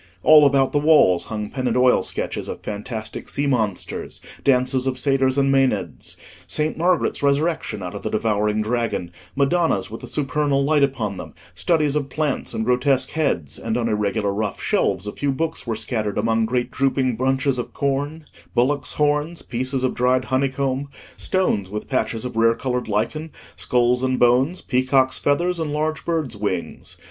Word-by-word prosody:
All 150 Hz, -2 st, +8 dB
about 135 Hz, -1 st, +2 dB
the 145 Hz, -, +2 dB
walls 145 Hz, -, +4 dB
hung 105 Hz, -1 st, -5 dB
pen 130 Hz, -1 st, -2 dB
and 120 Hz, 0 st, +1 dB
oil 125 Hz, 0 st, +4 dB
sketches -, -, -4 dB
of -, -, -6 dB
fantastic 110 Hz, +1 st, -6 dB
sea 145 Hz, -, -1 dB
monsters; 110 Hz, -8 st, -2 dB, 0.2 s
dances 130 Hz, 0 st, +2 dB
of 130 Hz, -1 st, -1 dB
satyrs 135 Hz, 0 st, +2 dB
and 135 Hz, -1 st, +3 dB
maenads; 105 Hz, -, 0 dB, 0.3 s
Saint 155 Hz, 0 st, 0 dB
Margaret's 175 Hz, +2 st, +1 dB
resurrection 145 Hz, -, 0 dB
out 90 Hz, -, -5 dB
of -, -, -6 dB
the -, -, -3 dB
devouring 105 Hz, -1 st, 0 dB
dragon; 115 Hz, -6 st, -2 dB, 0.2 s
Madonnas 140 Hz, -, +1 dB
with 115 Hz, -, -7 dB
the -, -, -8 dB
supernal 145 Hz, -1 st, 0 dB
light 150 Hz, +1 st, +2 dB
upon 115 Hz, -8 st, 0 dB
them; -, -, -9 dB, 0.2 s
studies 155 Hz, -4 st, +1 dB
of 140 Hz, -2 st, -1 dB
plants 150 Hz, -1 st, -2 dB
and 110 Hz, -, -1 dB
grotesque 125 Hz, +2 st, +2 dB
heads; 85 Hz, -, -1 dB
and 115 Hz, 0 st, -2 dB
on 120 Hz, -1 st, 0 dB
irregular 105 Hz, -1 st, 0 dB
rough 105 Hz, -1 st, -3 dB
shelves 95 Hz, 0 st, 0 dB
a 105 Hz, -, -3 dB
few 145 Hz, +4 st, -1 dB
books 160 Hz, 0 st, -3 dB
were 115 Hz, -, -1 dB
scattered 110 Hz, -2 st, -3 dB
among 115 Hz, +1 st, +1 dB
great 125 Hz, +1 st, -1 dB
drooping 130 Hz, -2 st, +1 dB
bunches 130 Hz, +2 st, 0 dB
of 120 Hz, -, -5 dB
corn, 145 Hz, +2 st, -2 dB, 0.3 s
bullocks' 130 Hz, +2 st, +1 dB
horns, 150 Hz, +3 st, 0 dB
pieces 130 Hz, +2 st, -2 dB
of 130 Hz, -, +1 dB
dried 125 Hz, +1 st, +2 dB
honeycomb, 135 Hz, +1 st, -1 dB, 0.3 s
stones 110 Hz, -, 0 dB
with 105 Hz, +1 st, -5 dB
patches 120 Hz, -3 st, -1 dB
of 125 Hz, -, -5 dB
rare 115 Hz, 0 st, +4 dB
coloured 125 Hz, -1 st, -2 dB
lichen, 115 Hz, +10 st, -2 dB, 0.3 s
skulls 125 Hz, 0 st, +1 dB
and 130 Hz, -1 st, 0 dB
bones, 130 Hz, +8 st, +3 dB
peacocks' 130 Hz, 0 st, +2 dB
feathers, 170 Hz, +5 st, +1 dB
and 160 Hz, -2 st, -2 dB
large 155 Hz, +1 st, -1 dB
birds' 160 Hz, -9 st, -1 dB
wings. 100 Hz, -4 st, -4 dB
130 Hz, 170 wpm, -22 LUFS, 115-145 Hz, 0.3 s, All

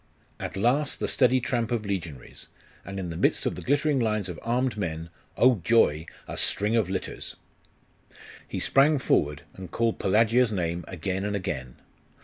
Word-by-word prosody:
At -, -, -5 dB
last 130 Hz, +8 st, +1 dB
the -, -, -1 dB
steady 130 Hz, -1 st, +3 dB
tramp 120 Hz, -2 st, -1 dB
of 115 Hz, -3 st, -1 dB
legionaries, 85 Hz, -10 st, -5 dB, 0.4 s
and 100 Hz, 0 st, -7 dB
in 90 Hz, -3 st, -4 dB
the -, -, -5 dB
midst -, -, +1 dB
of -, -, +1 dB
the -, -, -7 dB
glittering 145 Hz, +1 st, +2 dB
lines 110 Hz, -5 st, 0 dB
of 85 Hz, -, -6 dB
armed 125 Hz, +1 st, 0 dB
men 85 Hz, -4 st, -4 dB, 0.3 s
oh, 125 Hz, -6 st, +4 dB
joy! 80 Hz, -9 st, +3 dB, 0.2 s
a -, -, -6 dB
string 105 Hz, +3 st, +1 dB
of 110 Hz, -6 st, +2 dB
litters! 95 Hz, -, -4 dB, 1.1 s
He -, -, -4 dB
sprang 145 Hz, +3 st, +4 dB
forward, 75 Hz, -, +1 dB
and 95 Hz, -2 st, -9 dB
called 115 Hz, +4 st, 0 dB
Pelagia's 115 Hz, +4 st, +3 dB
name 85 Hz, -3 st, -2 dB
again 95 Hz, +2 st, -3 dB
and 105 Hz, 0 st, -1 dB
again. 70 Hz, -11 st, -4 dB
105 Hz, 165 wpm, -27 LUFS, 90-120 Hz, 1.1 s, oh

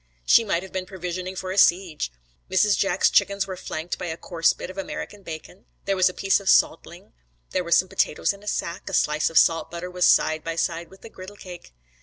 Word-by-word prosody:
She 230 Hz, -, +6 dB
might 190 Hz, -5 st, -1 dB
have 190 Hz, -, -11 dB
been 185 Hz, -1 st, -4 dB
provisioning 185 Hz, 0 st, -5 dB
for 185 Hz, 0 st, -5 dB
a 195 Hz, -, +1 dB
siege. 175 Hz, -, +2 dB, 0.4 s
Mrs. 190 Hz, +2 st, +3 dB
Jack's 195 Hz, -, +2 dB
chickens 200 Hz, 0 st, +2 dB
were 190 Hz, -1 st, -6 dB
flanked 165 Hz, -1 st, -5 dB
by 180 Hz, -, -4 dB
a 160 Hz, 0 st, -4 dB
coarse 165 Hz, -3 st, +1 dB
bit -, -, -7 dB
of 185 Hz, -, -16 dB
American 200 Hz, +1 st, -6 dB
bacon; 170 Hz, +2 st, -10 dB, 0.2 s
here 195 Hz, 0 st, 0 dB
was 185 Hz, -1 st, +4 dB
a -, -, -8 dB
piece 195 Hz, +1 st, +2 dB
of 195 Hz, -1 st, -3 dB
salt -, -, +3 dB
ling, -, -, -14 dB, 0.4 s
there 180 Hz, -2 st, -2 dB
some 170 Hz, +2 st, +4 dB
potatoes 195 Hz, +1 st, 0 dB
in 200 Hz, -, -15 dB
a 210 Hz, -, -15 dB
sack; 170 Hz, -4 st, -3 dB
a -, -, -8 dB
slice 150 Hz, 0 st, +1 dB
of 165 Hz, -, -2 dB
salt 165 Hz, 0 st, +4 dB
butter 170 Hz, +2 st, -6 dB
was 180 Hz, 0 st, +2 dB
side 155 Hz, 0 st, +3 dB
by 165 Hz, 0 st, -4 dB
side 165 Hz, +1 st, -2 dB
with 190 Hz, -, -16 dB
a -, -, -9 dB
griddle 190 Hz, 0 st, -11 dB
cake. 175 Hz, -, -12 dB
185 Hz, 230 wpm, -24 LUFS, 170-195 Hz, 0.4 s, She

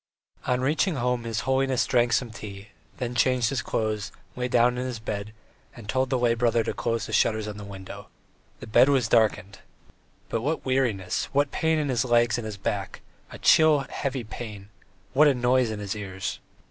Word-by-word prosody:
On 125 Hz, 0 st, +1 dB
reaching 155 Hz, +6 st, +1 dB
home 125 Hz, -2 st, -1 dB
his 115 Hz, -2 st, -2 dB
holiness 130 Hz, 0 st, +1 dB
drank 120 Hz, -2 st, +2 dB
some 120 Hz, 0 st, +1 dB
tea, 100 Hz, -2 st, -9 dB, 0.3 s
then 125 Hz, -1 st, -3 dB
changed 125 Hz, 0 st, +2 dB
his 135 Hz, -2 st, -1 dB
clothes, 110 Hz, -2 st, -2 dB, 0.2 s
lay 125 Hz, 0 st, -2 dB
down 125 Hz, 0 st, +3 dB
on -, -, -1 dB
his 130 Hz, -2 st, -4 dB
bed, 105 Hz, -1 st, -5 dB, 0.4 s
and 115 Hz, -4 st, -11 dB
told 130 Hz, +3 st, 0 dB
the 130 Hz, -, +1 dB
lay 120 Hz, -1 st, +2 dB
brother 115 Hz, -1 st, +2 dB
to -, -, -3 dB
close 115 Hz, -1 st, -2 dB
the -, -, -7 dB
shutters 110 Hz, -1 st, +2 dB
on 105 Hz, -1 st, -6 dB
the 105 Hz, -, -8 dB
windows. 95 Hz, -2 st, -9 dB, 0.6 s
The -, -, -6 dB
bedroom 135 Hz, +6 st, +5 dB
was 125 Hz, -5 st, +1 dB
darkened. 105 Hz, -4 st, +1 dB, 0.7 s
But 115 Hz, -, -2 dB
what 155 Hz, +6 st, -2 dB
weariness, 125 Hz, -8 st, 0 dB
what 145 Hz, 0 st, +2 dB
pain 160 Hz, 0 st, +1 dB
in 150 Hz, -2 st, -1 dB
his 120 Hz, -4 st, +1 dB
legs 120 Hz, -1 st, +2 dB
and 115 Hz, -, -6 dB
his 105 Hz, -2 st, -6 dB
back, 95 Hz, -, -4 dB, 0.3 s
a -, -, -8 dB
chill 155 Hz, -2 st, +5 dB
heavy 135 Hz, -3 st, -3 dB
pain, 105 Hz, -3 st, -8 dB, 0.4 s
what 150 Hz, +3 st, +6 dB
a 140 Hz, -, +4 dB
noise 125 Hz, 0 st, +2 dB
in 110 Hz, -, -4 dB
his 100 Hz, 0 st, -4 dB
ears! 95 Hz, -2 st, -5 dB
120 Hz, 195 wpm, -26 LUFS, 110-130 Hz, 0.7 s, what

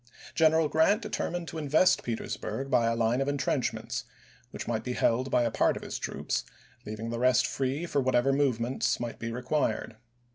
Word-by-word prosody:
General 160 Hz, -1 st, +4 dB
Grant 195 Hz, +9 st, +3 dB
determined 175 Hz, -4 st, -3 dB
to 160 Hz, -, -5 dB
invest 155 Hz, +5 st, +3 dB
Petersburg 115 Hz, +2 st, -4 dB
by 115 Hz, -1 st, +4 dB
a 115 Hz, -, +1 dB
line 115 Hz, +3 st, +1 dB
of 135 Hz, -, 0 dB
intrenchments, 140 Hz, -2 st, -1 dB, 0.4 s
which -, -, -7 dB
might 115 Hz, -2 st, -1 dB
be 125 Hz, -, -3 dB
held 125 Hz, +2 st, +1 dB
by 125 Hz, -, +3 dB
a 115 Hz, -, 0 dB
part -, -, +2 dB
of -, -, -8 dB
his -, -, -5 dB
troops, -, -, -2 dB, 0.4 s
leaving 110 Hz, +2 st, -5 dB
the 115 Hz, -, -3 dB
rest 130 Hz, +1 st, +4 dB
free 135 Hz, +5 st, -2 dB
for 145 Hz, -4 st, 0 dB
whatever 130 Hz, +1 st, +2 dB
move 135 Hz, -4 st, +2 dB
ments 120 Hz, +3 st, 0 dB
might 120 Hz, -1 st, -5 dB
be 115 Hz, 0 st, -4 dB
required. 125 Hz, -2 st, -1 dB
130 Hz, 185 wpm, -29 LUFS, 115-145 Hz, 0.4 s, General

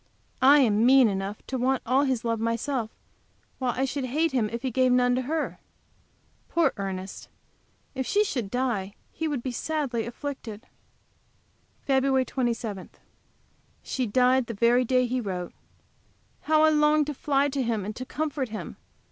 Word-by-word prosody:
I 280 Hz, +3 st, +7 dB
am 220 Hz, -3 st, +3 dB
mean 260 Hz, 0 st, +6 dB
enough 195 Hz, +1 st, -4 dB
to 260 Hz, -, -3 dB
want 260 Hz, +1 st, +1 dB
all 265 Hz, +4 st, +3 dB
his 255 Hz, -3 st, -1 dB
love 230 Hz, -1 st, 0 dB
myself, 230 Hz, +1 st, -1 dB, 0.7 s
while 255 Hz, -2 st, 0 dB
I 265 Hz, -, +2 dB
should 270 Hz, 0 st, -3 dB
hate 310 Hz, +6 st, 0 dB
him 235 Hz, -5 st, 0 dB
if 235 Hz, +2 st, -5 dB
he 260 Hz, -, -1 dB
gave 255 Hz, +1 st, +3 dB
none 245 Hz, 0 st, +3 dB
to 255 Hz, -, +1 dB
her. 305 Hz, +4 st, -3 dB, 0.9 s
Poor 340 Hz, -1 st, +2 dB
Ernest! 190 Hz, -1 st, -6 dB, 0.6 s
If 265 Hz, -2 st, -3 dB
she 415 Hz, +1 st, +3 dB
should 245 Hz, -, -3 dB
die 215 Hz, -5 st, -2 dB, 0.2 s
he 320 Hz, -, -3 dB
would 285 Hz, -6 st, -3 dB
be 255 Hz, -, -2 dB
sadly 260 Hz, -4 st, -2 dB
afflicted! 240 Hz, -3 st, -7 dB, 1.2 s
FEB. 265 Hz, -1 st, +2 dB
27. 230 Hz, -7 st, -3 dB, 0.9 s
She 255 Hz, -2 st, -2 dB
died 250 Hz, +3 st, +3 dB
the 230 Hz, -, -5 dB
very 240 Hz, +4 st, +3 dB
day 255 Hz, +1 st, +2 dB
he 250 Hz, +1 st, -1 dB
wrote. 180 Hz, -5 st, -5 dB, 0.9 s
How 310 Hz, 0 st, +4 dB
I 315 Hz, -, +6 dB
long 300 Hz, 0 st, +3 dB
to 295 Hz, -, -4 dB
fly 280 Hz, 0 st, +1 dB
to 275 Hz, 0 st, -2 dB
him 225 Hz, -5 st, -1 dB
and 210 Hz, +1 st, -5 dB
to 255 Hz, -, -4 dB
comfort 285 Hz, -2 st, -3 dB
him! 215 Hz, 0 st, -7 dB
255 Hz, 165 wpm, -26 LUFS, 230-275 Hz, 1.2 s, I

